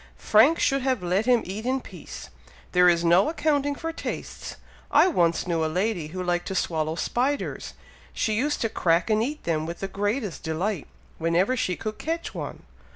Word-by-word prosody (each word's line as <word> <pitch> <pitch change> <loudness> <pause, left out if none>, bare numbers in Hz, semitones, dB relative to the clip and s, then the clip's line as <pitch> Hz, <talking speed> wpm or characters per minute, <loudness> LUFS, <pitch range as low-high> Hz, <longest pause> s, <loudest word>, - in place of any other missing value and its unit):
"Frank 250 +10 +5
should 275 -1 +2
have 255 -7 0
let 185 +6 0
him 245 -2 +4
eat 200 +4 -5
in 260 +2 0
peace! - - -10 0.4
There 180 0 +6
is 170 0 +2
no 175 - +5
accounting 290 -3 0
for 330 +2 -4
tastes. - - -6 0.3
I - - +5
once 170 - +2
knew 165 -2 0
a - - +1
lady 185 -2 -1
who 185 +4 -5
liked 175 -1 -1
to 190 - -3
swallow 160 -3 0
spiders! 260 +10 -2 0.4
She 220 - -1
used 285 +7 0
to 225 - +1
crack 170 +2 +1
and 215 0 +3
eat 295 +6 -3
them 160 -2 -1
with 170 - -6
the 195 - -3
greatest 205 +1 -2
delight, 165 +2 -2 0.3
whenever 175 +9 +2
she 185 -8 0
could 215 -1 -5
catch 330 -5 -3
one." 155 -6 -6
205 Hz, 185 wpm, -25 LUFS, 175-255 Hz, 0.4 s, There